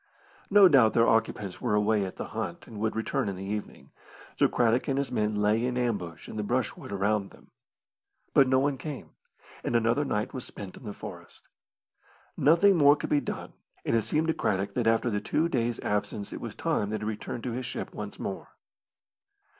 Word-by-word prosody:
No 200 -1 +8
doubt 130 -9 +5
their 115 0 +4
occupants 110 -4 0
were 105 - +1
away 105 -1 +2
at 95 - -7
the - - -6
hunt - - -5
and 110 - -9
would 110 +1 -1
return 110 -2 -1
in 95 - -4
the 95 +1 -7
evening, 105 +1 -6 0.4
so - - +4
Craddock 120 +2 +2
and 135 -2 0
his 140 0 -1
men 105 0 0
lay 105 +2 +2
in 125 0 -1
ambush 100 -10 -2
in - - -7
the - - 0
brushwood 120 -1 -2
around 100 0 0
them. - - -19 0.8
But 135 - +6
no 130 0 +4
one 135 0 +1
came, 150 -4 -7 0.5
and - - -1
another 115 +5 +3
night 105 -5 -2
was 130 -3 -5
spent 95 -2 -8
in - - -13
the 105 - -4
forest. - - -10 0.9
Nothing 170 +6 +5
more 145 -1 +7
could - - -6
be 145 - +4
done, - - -6 0.3
and - - +1
it 115 - +3
seemed 155 +8 0
to - - +3
Craddock 100 -5 -1
that 120 0 0
after 115 +1 +2
the 105 -1 -1
two 160 +2 +1
days' 120 -6 -1
absence 105 0 -2
it - - -6
was - - -6
time 100 - 0
that 110 - -3
he - - -3
returned 110 +2 -4
to 125 - -2
his 125 +1 -4
ship 120 - -5
once 105 -1 -6
more. 95 - -6
115 Hz, 205 wpm, -28 LUFS, 105-130 Hz, 0.9 s, No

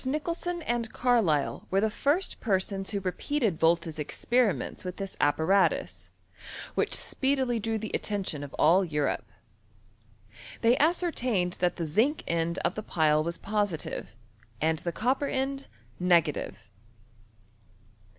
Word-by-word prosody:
Nicholson 335 +5 -2
and 235 -3 -1
Carlisle 220 - +1
were 190 - +2
the 215 +1 +1
first 300 - 0
per* 195 -4 +2
sons 195 0 -3
who 205 - -1
repeated 200 - -1
Volta's 165 -1 +2
experiments 235 - 0
with 180 -1 -5
this 195 -1 -5
ap 145 0 +3
paratus, 190 +5 +1 0.6
which - - +1
speedily 265 -3 0
drew 225 +1 -1
the 215 0 -5
attention 190 -8 -2
of 140 - -8
all 180 +5 +5
£iiJope. 150 -5 -1 1.4
They 235 +1 +5
ascertained 255 - +1
that 180 -1 +1
the 170 - -3
zinc 225 - +1
end 170 +1 0
of - - +1
the 215 - -4
pile 155 -6 +2
was 170 +1 -3
positive 205 - -2 0.4
and 160 0 +1
the 170 - -3
copper 260 +9 0
end 270 +1 -2 0.3
negative. 170 - +1
200 Hz, 130 wpm, -28 LUFS, 170-250 Hz, 1.4 s, all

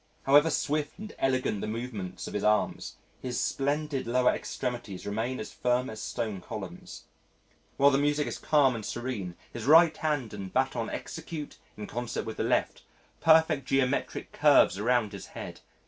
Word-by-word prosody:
However 145 +4 +6
swift 150 -1 -1
and 215 +2 -8
elegant 130 -6 0
the - - -3
movements 110 -5 -5
of - - -7
his 105 - -2
arms, 105 0 +1 0.3
his 125 -2 -3
splendid 145 -1 -1
lower 125 +1 +3
extremities 120 -7 -4
remain 115 +5 -2
as 110 - -7
firm 125 0 0
as 110 - -7
stone 105 -5 -3
columns. - - -8 0.7
While 140 +1 +6
the 135 - +2
music 145 +1 +1
is - - -5
calm 145 -4 +3
and 115 -2 -5
serene 105 -7 -4 0.2
his 120 -2 -5
right 160 +2 +7
hand 145 -8 -2
and 100 -2 -6
baton - - 0
execute 150 -3 -6 0.2
in 105 - -5
concert 120 +2 -4
with 110 - -6
the - - 0
left, - - 0 0.4
perfect 160 -4 +4
geometric 135 0 0
curves 95 - +5
around 115 -1 +2
his 100 -3 -8
head. - - -7
125 Hz, 160 wpm, -29 LUFS, 110-145 Hz, 0.7 s, right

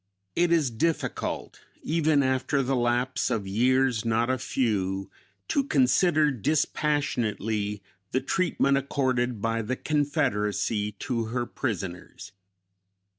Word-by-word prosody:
It 175 0 +2
is 155 -7 +3
difficult, 160 +8 -2 0.2
even 155 -3 +2
after 130 +1 +1
the 135 +1 0
lapse 120 +1 0
of 115 -5 -1
years 125 +3 +2
not 115 +2 +1
a 130 - -1
few, 100 -7 -1 0.4
to 280 - +2
consider 150 - +3
dispassionately 115 -7 -1 0.3
the 130 - +2
treatment 140 -6 +1
accorded 125 -5 -1
by 115 0 0
the 115 +4 -2
Confederacy 110 -9 0
to 115 +2 -3
her 120 +2 -2
prisoners. 95 -9 -5
125 Hz, 110 wpm, -27 LUFS, 110-145 Hz, 0.4 s, is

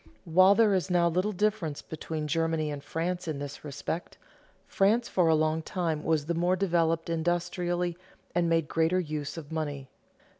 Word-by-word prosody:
While 185 +4 +6
there 220 -2 +4
is 190 0 0
now 175 -1 +3
little 185 +5 +1
difference 200 -7 -1
between 155 -1 -5
Germany 160 0 0
and 145 -1 -6
France 175 +3 -3
in 155 -3 -2
this 145 0 -7
respect, 145 +4 -5 0.5
France 220 +5 +2
for 180 -3 +2
a 160 - +5
long 155 +1 +1
time 160 -2 -2
was 155 -3 +1
the 170 - -1
more 175 +2 +2
developed 165 -3 +1
industrially 175 +1 -1 0.4
and 170 -1 +1
made 165 -2 +2
greater 165 +4 +2
use 150 -3 -4
of 160 -2 -8
money. 145 -4 -4
165 Hz, 165 wpm, -28 LUFS, 155-180 Hz, 0.5 s, While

